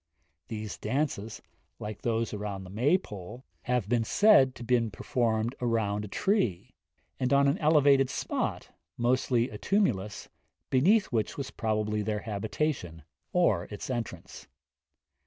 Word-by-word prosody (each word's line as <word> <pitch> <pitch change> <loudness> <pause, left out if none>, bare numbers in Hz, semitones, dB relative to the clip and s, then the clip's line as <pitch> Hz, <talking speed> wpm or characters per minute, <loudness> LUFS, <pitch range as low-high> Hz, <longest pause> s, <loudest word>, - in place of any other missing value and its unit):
These 110 -1 -6
dances, 130 -7 -2 0.3
like 105 -1 -7
those 115 -1 -1
round 100 -2 -4
the 90 - -11
Maypole, 120 - -1 0.2
have 125 -4 0
been 120 0 +2
said 135 - +5
to - - -8
be 120 -1 +2
performed 110 +3 -1
round 110 -3 0
a - - -7
tree; 120 - 0 0.5
and 125 0 0
on 140 0 +5
an 140 +7 +1
elevated 145 -4 +4
spot, - - -3 0.3
mostly 120 0 +1
a 105 - -8
tumulus, 105 - 0 0.4
beneath 190 - +4
which 110 -4 -1
was 140 -2 -4
probably 105 -1 -1
their 105 0 -2
habitation, 105 - -3 0.3
or 110 - +2
its 105 +5 -6
entrance. 95 -7 -6
115 Hz, 130 wpm, -29 LUFS, 105-135 Hz, 0.5 s, said